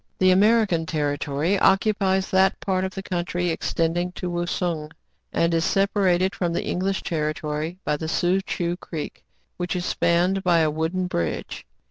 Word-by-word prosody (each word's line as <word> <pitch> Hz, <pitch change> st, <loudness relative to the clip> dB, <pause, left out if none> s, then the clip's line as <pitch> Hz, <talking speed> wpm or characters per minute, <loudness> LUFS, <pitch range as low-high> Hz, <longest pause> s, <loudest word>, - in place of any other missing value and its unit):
The 185 Hz, 0 st, +4 dB
American 200 Hz, -4 st, +3 dB
territory 150 Hz, +3 st, 0 dB
occupies 190 Hz, -1 st, +2 dB
that 190 Hz, 0 st, +3 dB
part 185 Hz, -1 st, -1 dB
of 190 Hz, 0 st, -4 dB
the 195 Hz, -, -5 dB
country 175 Hz, -1 st, -1 dB
extending 170 Hz, +2 st, -1 dB
to 180 Hz, -1 st, -4 dB
Wousung, 175 Hz, -2 st, -2 dB, 0.4 s
and 170 Hz, 0 st, +1 dB
is 165 Hz, 0 st, +2 dB
sepa 200 Hz, +2 st, +1 dB
rated 185 Hz, +1 st, +3 dB
from 175 Hz, -2 st, -1 dB
the -, -, -2 dB
English 190 Hz, +2 st, -1 dB
territory 155 Hz, +1 st, -2 dB
by 150 Hz, -, +1 dB
the 160 Hz, -, -4 dB
Soo 180 Hz, +4 st, +1 dB
Choo 175 Hz, -2 st, -2 dB
Creek, 160 Hz, -5 st, -7 dB, 0.3 s
which 180 Hz, +1 st, -2 dB
is 180 Hz, 0 st, -2 dB
spanned 180 Hz, +3 st, +1 dB
by 175 Hz, -2 st, +4 dB
a 155 Hz, -1 st, +2 dB
wooden 160 Hz, +4 st, -1 dB
bridge. 85 Hz, -, -3 dB
175 Hz, 160 wpm, -24 LUFS, 165-190 Hz, 0.4 s, The